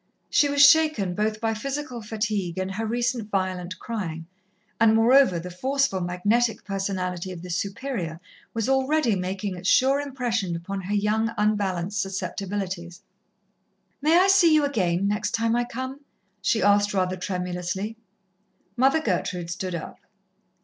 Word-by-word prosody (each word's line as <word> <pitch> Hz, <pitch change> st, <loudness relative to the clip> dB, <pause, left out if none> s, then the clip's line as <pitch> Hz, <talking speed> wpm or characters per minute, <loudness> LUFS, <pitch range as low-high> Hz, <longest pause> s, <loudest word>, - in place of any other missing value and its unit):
She 290 Hz, -, +4 dB
was 285 Hz, 0 st, +7 dB
shaken 305 Hz, -, +3 dB
both 215 Hz, +2 st, -1 dB
by 225 Hz, 0 st, 0 dB
physical 270 Hz, +1 st, -4 dB
fatigue 210 Hz, -5 st, -2 dB
and 190 Hz, 0 st, -2 dB
her 220 Hz, +3 st, -3 dB
recent 235 Hz, -1 st, -1 dB
violent 185 Hz, -2 st, -2 dB
crying, 170 Hz, -8 st, -5 dB, 0.5 s
and 225 Hz, -1 st, +5 dB
moreover, 235 Hz, -3 st, +5 dB
the 180 Hz, +2 st, -6 dB
forceful, 265 Hz, 0 st, 0 dB
magnetic 205 Hz, +7 st, 0 dB
personality 190 Hz, -2 st, -3 dB
of 175 Hz, -1 st, -8 dB
the 180 Hz, -, -6 dB
Superior 190 Hz, -, -3 dB, 0.3 s
was 225 Hz, 0 st, -2 dB
already 265 Hz, -2 st, +2 dB
making 190 Hz, +1 st, -3 dB
its 180 Hz, +2 st, -2 dB
sure 270 Hz, +2 st, +4 dB
impression 240 Hz, -10 st, -2 dB
upon 195 Hz, +4 st, -5 dB
her 195 Hz, +3 st, -2 dB
young, 215 Hz, +2 st, +1 dB
unbalanced 205 Hz, -2 st, 0 dB
susceptibilities. 190 Hz, -1 st, -4 dB, 1.0 s
"May 315 Hz, +4 st, +4 dB
I 370 Hz, +2 st, +5 dB
see 390 Hz, -4 st, +6 dB
you 305 Hz, -2 st, +4 dB
again, 190 Hz, -8 st, 0 dB
next 210 Hz, +3 st, -1 dB
time 225 Hz, 0 st, +1 dB
I 240 Hz, 0 st, +1 dB
come?" 260 Hz, +3 st, -6 dB, 0.4 s
she 220 Hz, -, +1 dB
asked 205 Hz, 0 st, +3 dB
rather 185 Hz, -1 st, +1 dB
tremulously. 180 Hz, +2 st, -3 dB, 0.8 s
Mother 270 Hz, +5 st, +3 dB
Gertrude 180 Hz, -, -2 dB
stood 185 Hz, 0 st, -4 dB
up. 165 Hz, -, -7 dB
205 Hz, 140 wpm, -25 LUFS, 185-240 Hz, 1.0 s, was